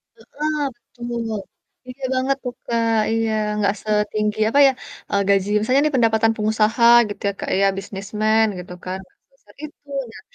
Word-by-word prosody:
Heeh, 295 Hz, +5 st, -3 dB
betul. 235 Hz, -4 st, -5 dB, 0.5 s
Iya 265 Hz, +2 st, -15 dB
banget 265 Hz, +1 st, +1 dB
tuh, 250 Hz, -2 st, -4 dB
Kak, 230 Hz, -1 st, +1 dB, 0.2 s
iya, 225 Hz, 0 st, 0 dB, 0.3 s
nggak 200 Hz, -1 st, +1 dB
setinggi 210 Hz, 0 st, -1 dB
apa 280 Hz, -, +2 dB
ya, -, -, +4 dB, 0.4 s
eee, 200 Hz, -1 st, +1 dB
gaji 200 Hz, 0 st, +2 dB
misalnya 255 Hz, +6 st, +2 dB
ini 300 Hz, -2 st, 0 dB
pendapatan 225 Hz, -1 st, +3 dB
pengusaha 220 Hz, +2 st, +1 dB, 0.3 s
gitu 205 Hz, -, -8 dB
ya, -, -, -3 dB
Kak, -, -, -4 dB
ya -, -, +4 dB
businessman 215 Hz, +3 st, 0 dB
gitu 180 Hz, 0 st, -9 dB
kan 185 Hz, +1 st, -3 dB
gak -, -, -35 dB
sebesar 270 Hz, -, -25 dB
itu, 295 Hz, -1 st, -11 dB, 0.2 s
nah -, -, -12 dB
225 Hz, 160 wpm, -21 LUFS, 210-250 Hz, 0.5 s, ya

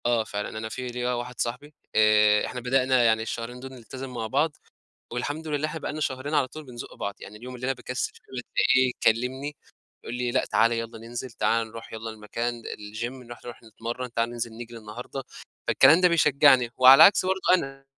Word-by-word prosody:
آه 120 Hz, -2 st, +2 dB
فعلًا 105 Hz, 0 st, -5 dB
أنا 110 Hz, 0 st, -4 dB
في 130 Hz, +2 st, -5 dB
ليَّ 125 Hz, 0 st, -4 dB
واحد 120 Hz, 0 st, -5 dB
صاحبي 125 Hz, +6 st, -3 dB, 0.2 s
آآ، 105 Hz, -1 st, +5 dB
إحنا 125 Hz, -, -5 dB
بدأنا 130 Hz, 0 st, +3 dB
يعني 110 Hz, -1 st, +3 dB
الشهرين 115 Hz, +2 st, -5 dB
دول 130 Hz, +1 st, -9 dB
نلتزم 130 Hz, +2 st, -8 dB
مع 115 Hz, -2 st, -3 dB
بعض 145 Hz, +5 st, +1 dB, 0.6 s
والحمد 145 Hz, +6 st, -4 dB
لله 150 Hz, 0 st, -1 dB
إحنا 160 Hz, +1 st, -6 dB
بقى -, -, -4 dB
لنا 155 Hz, -, -5 dB
شهرين 140 Hz, +1 st, -2 dB
على 140 Hz, -3 st, +2 dB
طول 155 Hz, +4 st, -10 dB
بنزُق 120 Hz, -2 st, -9 dB
بعض، 100 Hz, -, -4 dB
يعني 105 Hz, -, -10 dB
اليوم 125 Hz, +4 st, -9 dB
اللي 125 Hz, -, -8 dB
أنا 135 Hz, -, +1 dB
باكسل 125 Hz, 0 st, -4 dB
فيه -, -, -18 dB
ألاقيه 130 Hz, 0 st, +2 dB
كلمني 130 Hz, +6 st, 0 dB, 0.5 s
يقول -, -, -6 dB
لي: 125 Hz, 0 st, -1 dB
"لأ 130 Hz, -, +1 dB
تعالَ 115 Hz, +1 st, +3 dB
يالّا 115 Hz, 0 st, -4 dB
ننزل، 120 Hz, +3 st, -7 dB
تعالَ 115 Hz, 0 st, 0 dB
نروح 115 Hz, +1 st, -11 dB
يالّا 110 Hz, 0 st, -6 dB
المكان 115 Hz, +2 st, -4 dB
الجيم 115 Hz, +5 st, -6 dB
نروح 120 Hz, 0 st, -12 dB
نروح 120 Hz, 0 st, -9 dB
نتمرن، 115 Hz, +2 st, -6 dB
تعالَ 115 Hz, 0 st, 0 dB
ننزل 120 Hz, -1 st, -4 dB
نجري 120 Hz, 0 st, -9 dB
النهارده،" 120 Hz, +5 st, -7 dB, 0.4 s
فالكلام 165 Hz, +4 st, +6 dB
ده 180 Hz, -, +6 dB
بيشجعني، 140 Hz, -6 st, +4 dB
وعلى 130 Hz, +1 st, +9 dB
العكس 185 Hz, +6 st, +7 dB
برضو 190 Hz, 0 st, 0 dB
أنا، 135 Hz, -5 st, -2 dB
125 Hz, 195 wpm, -26 LUFS, 115-135 Hz, 0.6 s, وعلى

